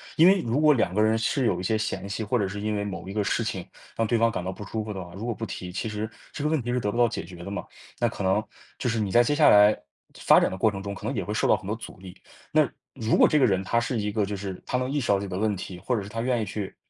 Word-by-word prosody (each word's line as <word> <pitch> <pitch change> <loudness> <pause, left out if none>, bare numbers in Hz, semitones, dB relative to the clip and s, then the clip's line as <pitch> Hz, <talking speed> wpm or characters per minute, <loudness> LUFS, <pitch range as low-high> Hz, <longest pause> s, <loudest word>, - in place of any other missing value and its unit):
因 160 - +6
为 190 +1 +6
如 120 +1 0
果 150 -1 +6
2 110 -8 +1
个 105 - +1
人 110 +1 +3
是 125 +4 0
有 95 -6 +1
一 - - -4
些 110 +4 +1
嫌 110 -2 -3
隙， 105 +2 -3
或 115 +4 0
者 100 - +1
是 100 +2 -5
因 105 +1 -1
为 100 - -1
某 100 -2 -6
一 95 - -6
个 105 -1 0
事 115 - 0
情 95 -5 -4 0.3
让 115 - 0
对 120 - +2
方 115 0 +3
感 95 -4 -3
到 95 - -3
不 95 +2 -8
舒 110 0 -3
服 105 - -6
的 95 -2 -5
话， 85 - -13
如 100 +5 -6
果 120 - 0
不 115 - -4
提， 90 -4 -6
其 95 +5 -3
实 105 +1 -3 0.2
这 145 - -5
个 150 - +1
问 160 - +1
题 120 - -3
是 125 - +1
得 105 -3 -1
不 115 - -5
到 120 0 +5
解 105 - -4
决 90 +1 -11
的 100 - -6
嘛。 100 - -3 0.4
那 120 - +2
可 100 - -6
能 95 +3 +2 0.4
就 125 - 0
是 115 -1 0
你 100 -3 -1
在 120 - +6
接 145 +5 +1
下 155 - +6
来 105 +1 +6 0.4
发 - - +6
展 - - +2
的 95 - -5
过 110 +3 +3
程 95 -1 -6
中 100 0 -5
可 105 - -9
能 135 +5 -2
也 - - -1
会 105 - -5
受 110 - +1
到 - - +5
很 100 - -8
多 105 - -1
阻 115 - -10
力。 95 -1 -12 0.3
那 155 -1 +4 0.3
如 115 -4 +1
果 - - +6
这 155 - +3
个 135 - +5
人 95 -4 +1
他 115 +4 +1
是 120 0 -2
一 105 0 -1
个， 105 -1 0
就 100 +1 -4
是， 95 -1 -6
他 - - -3
能 130 0 -2
意 145 +1 0
识 125 - -3
到 100 -1 +4
自 - - -6
己 - - -6
的 90 - -3
问 105 0 +1
题， 90 -1 -7
或 115 +8 -1
者 110 - -1
是 100 - -8
他 115 - -5
愿 120 -1 +1
意 - - -1
去 100 0 -5
105 Hz, 375 characters per minute, -26 LUFS, 100-120 Hz, 0.4 s, 因